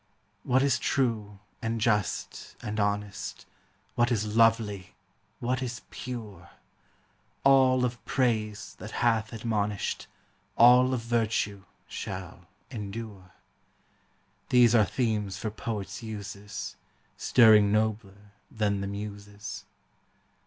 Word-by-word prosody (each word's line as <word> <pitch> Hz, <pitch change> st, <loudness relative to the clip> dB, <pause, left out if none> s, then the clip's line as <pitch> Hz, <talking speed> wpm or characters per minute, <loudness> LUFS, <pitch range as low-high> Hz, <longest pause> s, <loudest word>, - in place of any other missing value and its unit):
What 130 Hz, +2 st, +2 dB
is 140 Hz, -2 st, +2 dB
true 110 Hz, -6 st, 0 dB, 0.2 s
and 115 Hz, -1 st, -2 dB
just 105 Hz, -5 st, -1 dB
and 105 Hz, +1 st, -3 dB
honest, 105 Hz, 0 st, -2 dB, 0.5 s
What 120 Hz, +1 st, +2 dB
is 105 Hz, -2 st, -1 dB
lovely, 110 Hz, -5 st, +2 dB, 0.4 s
what 125 Hz, +2 st, -1 dB
is 125 Hz, -1 st, -4 dB
pure, 115 Hz, -5 st, -7 dB, 0.5 s
— -, -, -39 dB
All 130 Hz, -2 st, +5 dB
of 120 Hz, 0 st, -4 dB
praise 110 Hz, -5 st, -1 dB
that -, -, -7 dB, 0.2 s
hath 110 Hz, -2 st, +2 dB
admonish'd, 105 Hz, -3 st, -2 dB, 0.5 s
All 125 Hz, +2 st, +7 dB
of 120 Hz, -, -3 dB
virtue, 110 Hz, -4 st, -1 dB, 0.2 s
shall 90 Hz, -2 st, -7 dB, 0.2 s
endure, 105 Hz, -4 st, -7 dB, 0.6 s
— -, -, -40 dB
These 120 Hz, -2 st, +6 dB
are 110 Hz, -3 st, +6 dB
themes 105 Hz, -2 st, -1 dB
for 110 Hz, +2 st, -3 dB
poets' 105 Hz, -2 st, -5 dB
uses, 105 Hz, -2 st, -7 dB, 0.4 s
Stirring 110 Hz, -4 st, +6 dB
nobler 105 Hz, -2 st, -1 dB, 0.2 s
than 105 Hz, -3 st, 0 dB
the 100 Hz, -, -3 dB
Muses. 105 Hz, +1 st, -7 dB
110 Hz, 110 wpm, -28 LUFS, 100-120 Hz, 0.6 s, All